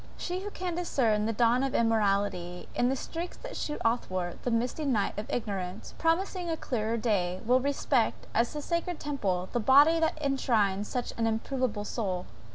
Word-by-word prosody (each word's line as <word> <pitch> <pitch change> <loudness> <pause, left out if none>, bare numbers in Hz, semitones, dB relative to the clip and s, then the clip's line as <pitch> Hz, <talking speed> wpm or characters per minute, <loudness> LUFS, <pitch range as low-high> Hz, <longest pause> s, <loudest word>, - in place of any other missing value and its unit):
She 360 +1 -3
who 405 +2 -5
can 365 -3 -4
discern 235 -11 +1
the - - +1
dawn 235 +2 +3
of 270 -1 -1
immortality, 200 -5 +1
in 245 - +2
the 265 - +1
streaks 335 +6 -5
that - - -8
shoot 295 - -3
athwart 185 -6 -1
the - - -1
misty 245 +6 0
night 225 -9 +1
of 210 +2 -5
ignorance, 195 -5 -3
promising 350 +2 0
a 325 - -1
clearer 230 -5 -1
day, 185 -5 0
will 250 +3 +5
respect, 275 -3 0
as 235 +5 +1
a 295 - -4
sacred 340 +1 -2
temple, 195 -11 -1
the 240 - 0
body 285 +8 +6
that 320 -1 +1
enshrines 220 -8 +1
such 250 -1 -3
an 225 - +2
improvable 225 -1 -1
soul. 190 -6 -2
240 Hz, 175 wpm, -29 LUFS, 205-295 Hz, -, body